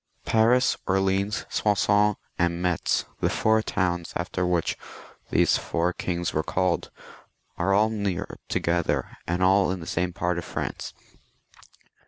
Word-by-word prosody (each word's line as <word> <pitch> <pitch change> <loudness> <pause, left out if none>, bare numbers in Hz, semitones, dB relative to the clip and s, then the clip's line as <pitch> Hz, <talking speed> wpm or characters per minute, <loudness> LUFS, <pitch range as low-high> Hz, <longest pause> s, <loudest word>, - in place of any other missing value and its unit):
Paris, 120 +3 +3
Orleans, 95 +2 +1
Soissons, 105 0 +2 0.2
and 85 0 +1
Metz, 90 -2 0
the - - +1
four 110 0 +2
towns 85 -5 -1
after 90 +1 -1
which 90 -2 0 0.5
these - - +3
four 85 +1 -1
kings 85 -1 -2
were 80 - +1
called, 90 +2 0 0.7
are 95 +3 +1
aU 110 +2 +4
near 100 -5 -3
together, 85 0 0
and 90 +2 0
all 95 +1 +4
in 95 0 -2
the 80 - -8
same 90 +1 -1
part 85 0 -1
of - - -6
France. - - -5
90 Hz, 135 wpm, -26 LUFS, 85-100 Hz, 0.7 s, aU